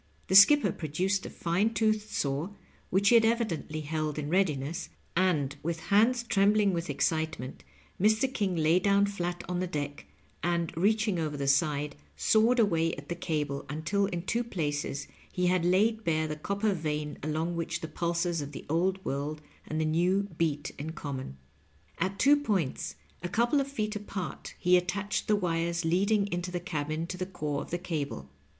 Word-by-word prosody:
The 190 - +2
skipper 290 +10 +8
pro 155 - -6
duced 190 +6 0
a - - -7
fine 195 +7 0
toothed 215 -1 +1
saw, 140 +2 -1 0.4
which 200 +2 +3
he - - +5
had 230 - +7
evidently 215 -9 0
held 155 0 -2
in 150 0 -3
readiness, 165 -5 0 0.3
and 155 -6 +2
with 165 +1 -2
hands 235 +4 +4
trembling 205 -2 +3
with 170 -1 -3
excitement 150 -1 -2 0.4
Mr. 220 +6 +3
King 200 -7 0
lay 160 +2 +3
down 200 +1 +3
flat 175 -3 -3
on 180 0 -2
the 185 - -1
deck, 145 -3 -5 0.3
and, 170 -2 -1
reaching 210 +1 +2
over 155 -2 -2
the 140 - -2
side, 145 +1 +1 0.2
sawed 220 - +3
away 165 -6 +2
at 145 +1 -11
the 175 - -2
cable, 150 -5 -2
until 175 +7 0
in 175 -3 -4
two 235 +5 0
places 145 -9 -3 0.2
he 180 - 0
had 180 -1 +2
laid 215 +5 +2
bare 160 -2 +1
the 155 - -3
copper 200 +6 -1
vein 150 -3 -3
along 160 +3 -2
which 165 0 -3
the 160 - -4
pulses 170 0 -1
of 145 +1 -7
the - - -8
Old 185 +5 0
World 145 +3 -2 0.3
and 155 - -2
the 160 - +1
New 175 +5 +2
beat 150 -3 -1
in 155 +3 -5
common. 135 - -6 0.6
At 190 +3 -1
two 285 +6 +5
points 200 - -1 0.3
a 175 - -3
couple 240 +9 +2
of 275 - -3
feet 215 -6 -3
apart 200 -4 -6
he 180 +1 +4
attached 190 +3 -2
the 215 - +4
wires 170 -2 -1
lead 180 +5 +2
ing 210 -2 +3
into 175 +1 -2
the 180 0 -3
cabin 155 -1 -3
to 180 +2 -6
the 185 0 -3
core 150 -6 -3
of - - -8
the 175 - -1
cable. 145 - -4
175 Hz, 185 wpm, -29 LUFS, 155-200 Hz, 0.6 s, skipper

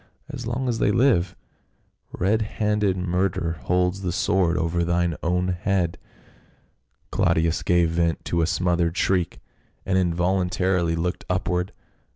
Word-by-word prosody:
as 120 -2 -6
long 125 +2 -2
as 115 -2 -1
they - - +3
live, 105 -6 +2 0.8
red 105 +5 +1
handed 105 -3 0
murder 90 -2 -1
holds 90 +3 +1
the 90 -2 -2
sword 90 -2 +1
over 85 +1 0
thine 85 -1 0
own 90 +2 0
head." 90 -1 -1 1.1
Claudius 80 0 +1
gave 85 -2 +2
vent 85 -1 0
to 85 - 0
a 80 - +2
smothered 85 0 0
shriek 90 -3 0 0.5
and 95 0 +2
in 90 -2 +1
voluntarily 90 -1 +1
looked 90 +2 -2
upward. 90 0 -1
90 Hz, 135 wpm, -24 LUFS, 85-95 Hz, 1.1 s, they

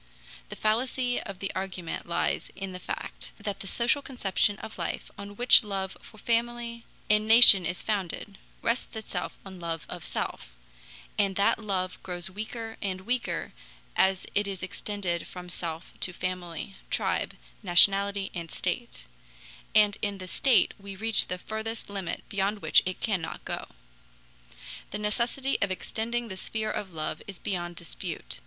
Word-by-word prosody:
The - - -6
fallacy 245 +3 +1
of 195 -2 -7
the 195 +1 -3
argument 185 -4 -4
lies 170 - 0
in 195 -1 -5
the 180 - -7
fact - - -6
that 205 -1 -3
the 195 - -6
social 245 +8 +2
conception 210 -6 +1
of 220 - -8
life, - - -3
on 200 0 -8
which 245 +2 +8
love 195 -2 -3
for - - -15
family 235 +1 -1 0.2
and 210 0 +3
nation 220 -6 +10
is 175 - -3
founded, 200 -1 -2 0.2
rests 235 0 0
itself 220 -1 -4
on 190 -2 -9
love 165 -2 -3
of - - -6
self, - - -4 0.6
and 195 -2 +2
that 200 +3 +3
love 190 -4 -2
grows 180 0 -4
weaker 225 +3 -5
and 185 -2 -2
weaker 245 +5 -2 0.4
as 190 -1 +3
it 205 0 +1
is 195 -2 -5
extended 185 -2 -3
from 180 -1 -8
self 165 -1 -5
to 180 - +1
family, 180 0 -4 0.2
tribe, - - 0 0.3
nationality, 195 +1 +5
and 170 -2 -5
slate; - - -3 0.7
and 210 -1 +5
in 205 -1 -1
the 185 -1 -7
state 250 +7 +4
we 200 0 -8
reach 225 +2 +6
the 180 - -3
furthest 220 +2 -4
limit 195 -4 -3
beyond 200 +1 0
which - - +6
it 185 - -3
cannot 190 -7 -2
go. - - -4 1.2
The - - -3
necessity 235 +6 0
of 200 - +2
extending 230 +5 -2
the 190 -3 -7
sphere 215 +3 -2
of 195 -3 -4
love 155 -1 -3
is 195 -2 -8
beyond 175 -3 -3
dispute. 165 - -4
200 Hz, 155 wpm, -28 LUFS, 185-220 Hz, 1.2 s, nation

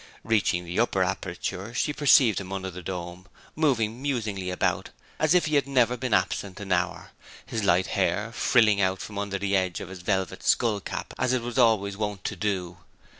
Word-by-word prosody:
Reaching 100 -5 +1
the 85 +1 -3
upper - - +2
aperture 100 +6 -4
she 150 - 0
perceived 130 -8 +5
him 95 -1 -9
under 95 -1 -4
the 90 +1 -8
dome, 90 +1 -6 0.3
moving 125 -7 +1
musingly 110 -9 -2
about 90 - -1 0.3
as 155 +2 +3
if 180 - +4
he 155 - -2
had 140 -2 +3
never 125 -3 +3
been 130 -1 -4
absent 95 0 0
an 100 -2 -7
hour, 90 0 -1 0.3
his 110 - -3
light 95 -1 +3
hair 100 +3 0
frilling 110 -5 +3
out 95 0 +1
from 100 -2 -6
under 100 -1 -2
the 100 0 0
edge 95 -2 0
of - - -7
his 95 -2 -9
velvet 95 0 -1
skull 110 -3 +2
cap - - -6
as 130 - +1
it 125 -2 0
was 120 +1 -3
always 105 -4 +3
wont 105 -2 -3
to 105 - -3
do. 95 -2 -2
100 Hz, 195 wpm, -26 LUFS, 95-115 Hz, 0.3 s, perceived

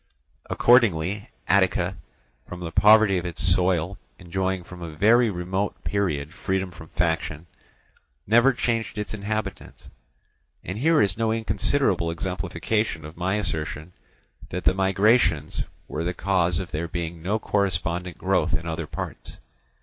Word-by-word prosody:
Accordingly 105 -5 +3 0.2
Attica, 95 0 +2 0.5
from 90 - -8
the 85 -2 -5
poverty 105 -1 +6
of 90 - -7
its 85 - -6
soil 90 0 +2 0.2
enjoying 95 +1 -2
from 90 +1 -12
a 80 -2 -7
very 115 +7 +4
remote 95 +1 -3
period 80 -7 -1
freedom 95 -2 -2
from 80 -2 -12
faction, 80 -1 -1 0.8
never 120 +5 +5
changed 115 -3 -2
its 105 0 -4
inhabitants. 105 -1 -5 0.7
And 95 +4 -5
here 160 +3 +4
is 100 +1 0
no 115 -1 +1
inconsiderable 110 -2 +1
exemplification 90 +1 -2
of 75 +2 -10
my 95 +3 -1
assertion 80 -4 -3 0.6
that 90 - -4
the - - +4
migrations 95 -4 +2 0.2
were 80 - -3
the 90 +1 -2
cause 90 -3 +1
of 90 -2 -6
there 80 +3 -2
being 85 -1 -5
no 100 +6 0
correspondent 90 -4 -1
growth - - +1
in 80 - -5
other 80 -1 -4
parts. - - -7
95 Hz, 135 wpm, -24 LUFS, 85-105 Hz, 0.8 s, poverty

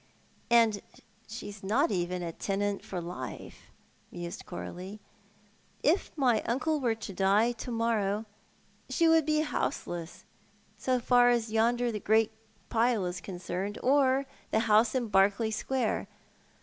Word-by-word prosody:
•• - - -34 0.5
And 230 -3 +4 0.5
sho 220 - -7
is 205 0 -8
not 215 +6 +2
even 180 -1 -1 0.2
tenant 200 0 -1
for 185 - -5
life,*' 175 +1 -8 0.4
mused 175 +3 -7
Coralie. 185 +3 -7 0.5
" 205 +1 -35
If 385 - -4
my 245 -6 +3
uncle 300 +6 0
were 240 -4 +1
to 220 -3 -7
die 200 +5 +3
to 240 +1 -7
muxnjw 225 -3 0 0.6
she 335 - +2
Avould 325 -2 +4
l>e 305 0 +3
houseless 175 - -3 0.3
— - - -35
so 255 -1 +2
far 245 0 +5
as 235 -2 +1
yonder 235 +2 +2
great - - -22
grey 220 +1 +3 0.4
pile 230 -3 +2
is 180 +1 -4
concerned 185 +2 -4
— - - -13
or 270 0 +3 0.2
the 220 - +2
house 220 +2 +3
iu 245 -3 0
Berkeley 205 +2 +3
Square. 260 +3 -1
220 Hz, 150 wpm, -29 LUFS, 195-245 Hz, 0.6 s, far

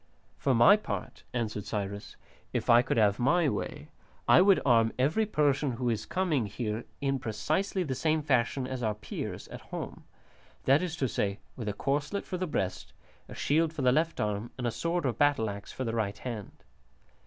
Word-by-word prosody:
"For 135 -2 +2
my 120 - +7
part," 210 - -5
answered 110 -4 -3
Cyrus, 100 -1 -4 0.4
"if - - +1
I 120 +1 +8
could 125 - -1
have 105 -1 +3
my 165 +6 +3
way, - - -3 0.4
I - - +7
would 195 0 +6
arm 115 -3 +4
every 155 +12 +2
Persian 145 - +1
who 120 0 -1
is 110 -1 -3
coming 160 - 0
here 110 +2 -3 0.2
in 135 -1 0
precisely 150 - -1
the 140 -6 -2
same 155 +3 +1
fashion 130 -1 +1
as 130 0 -4
our 110 -2 0
Peers 105 - -6
at - - -8
home, - - -7 0.6
that 135 +3 +4
is 175 -2 -3
to 135 - 0
say, 100 -3 -1 0.2
with 115 -4 -4
a - - -2
corslet 145 - -1
for 185 - -4
the 185 - -1
breast, 95 - -3 0.4
a - - -8
shield 160 +2 +1
for 150 -4 -3
the 125 - +5
left 160 +5 +1
arm, 105 +2 -1
and 125 - -3
a 120 - +1
sword 170 +5 -1
or 130 - +1
battle 135 -4 +2
axe 100 0 -8
for 130 - -4
the 115 -2 -2
right 110 -3 -1
hand. 115 -5 -7
130 Hz, 195 wpm, -29 LUFS, 110-155 Hz, 0.6 s, I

